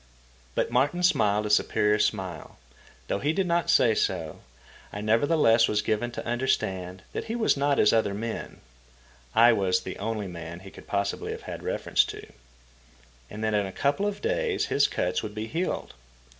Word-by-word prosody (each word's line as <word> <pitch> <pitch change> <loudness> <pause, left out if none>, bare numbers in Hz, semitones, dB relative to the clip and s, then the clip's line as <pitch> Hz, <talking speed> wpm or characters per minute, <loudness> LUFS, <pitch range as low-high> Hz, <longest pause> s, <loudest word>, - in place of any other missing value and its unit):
But - - 0
Martin 145 +8 +1
smiled 105 - +3
a 105 - -1
superior 105 0 +2
smile. 90 -5 -2 0.5
Though - - -1
he 145 +6 0
did 195 +2 0
not 170 -1 0
say 120 -8 +5
so, 85 -7 -2 0.5
I 105 - -6
nevertheless 115 +1 +3
was 105 0 0
given 110 +3 0
to - - -6
understand 95 -7 -1
that - - -4
he 225 - -3
was 230 -2 +2
not 140 0 +1
as 105 - +4
other 105 -3 +1
men 115 +2 -5 0.7
(I 115 +1 +7
was 95 -4 +1
the 95 - -7
only 110 0 -3
man 85 -1 -8
he 95 0 -11
could - - -14
possibly 100 0 -2
have - - -9
had - - -7
reference - - +1
to), - - -8 1.0
and 110 +1 -7
that 110 0 0
in 105 -2 +1
a - - -7
couple 145 - 0
of 205 - -5
days 480 -2 0
his 140 - +4
cuts 90 +1 -1
would 105 0 -7
be 110 0 -3
healed. 165 +10 -3
110 Hz, 180 wpm, -27 LUFS, 100-145 Hz, 1.0 s, I